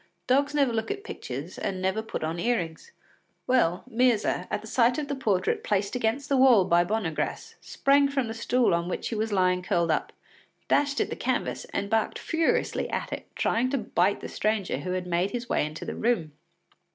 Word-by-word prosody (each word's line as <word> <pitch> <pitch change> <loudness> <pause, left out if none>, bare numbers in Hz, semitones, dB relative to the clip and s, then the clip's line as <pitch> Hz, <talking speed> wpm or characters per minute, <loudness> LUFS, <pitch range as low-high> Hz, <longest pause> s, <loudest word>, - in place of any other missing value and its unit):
Dogs 280 +3 +2
never 275 -5 +3
look 225 -1 -2
at 405 0 -4
pictures 145 - -7
and 190 -1 -2
never 190 +3 0
put 220 - -5
on 160 +2 -2
earrings. 175 - -2 0.5
Well, 180 -9 +2
Myrza, 245 -2 +1
at - - -2
the - - -11
sight 245 -1 +3
of 300 -2 -2
the 285 - -2
portrait 200 -8 0
placed 200 +1 0
against 250 +4 -1
the 275 - +2
wall 250 -7 +6
by 175 -1 +4
Bonnegr√¢ce, 180 -4 -2
sprang 280 0 +3
from 270 -4 -1
the 225 - -4
stool 235 -1 +2
on 170 +1 0
which - - -3
she - - -3
was 220 0 -1
lying 185 -2 +2
curled 170 -2 +1
up, - - -1 0.6
dashed 285 -1 +2
at - - 0
the - - -2
canvas - - -2
and 200 - -3
barked 220 +1 0
furiously 325 -1 0
at - - -3
it, - - -6
trying 245 +3 +1
to 275 - 0
bite 200 -4 +1
the - - -5
stranger 215 -3 -1
who 180 - -3
had 185 -1 -2
made 180 +2 0
his 240 +2 -4
way - - +1
into 155 +1 -8
the - - -4
room. 215 -10 0
220 Hz, 200 wpm, -27 LUFS, 180-255 Hz, 0.6 s, wall